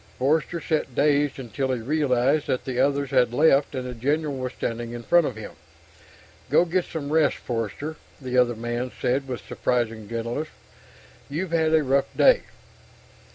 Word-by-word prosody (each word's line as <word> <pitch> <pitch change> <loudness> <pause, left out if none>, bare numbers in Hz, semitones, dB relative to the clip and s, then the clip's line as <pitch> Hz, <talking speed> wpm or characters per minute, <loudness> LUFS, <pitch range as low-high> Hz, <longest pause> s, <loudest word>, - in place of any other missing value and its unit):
Forster 155 +5 +1
sat, 150 -5 -2
dazed, 145 -1 +2
until 130 +1 -3
he 125 - -1
realized 140 +2 +1
that 130 - -1
the 125 -2 -3
others 140 -1 +1
had 125 -3 +3
left, 140 +1 +3
and 130 -1 -3
the 125 - -5
general 145 +5 -1
was 130 -1 -4
standing 115 0 -4
in 120 0 -6
front 175 +4 +4
of 125 - -5
him. 110 - -8 1.0
"Go 175 - +4
get 180 +1 0
some 150 -2 -5
rest, 160 -2 +3
Forster," 120 +7 -4 0.2
the 130 -2 -4
other 125 -1 +3
man 120 +2 -3
said 135 +2 0
with 125 -5 -6
surprising 115 -4 -2
gentleness. 115 +6 -3 0.8
"You've 165 +5 -3
had 160 -1 +2
a 155 - +3
tough 135 +1 +2
day." - - +6
135 Hz, 165 wpm, -25 LUFS, 120-150 Hz, 1.0 s, day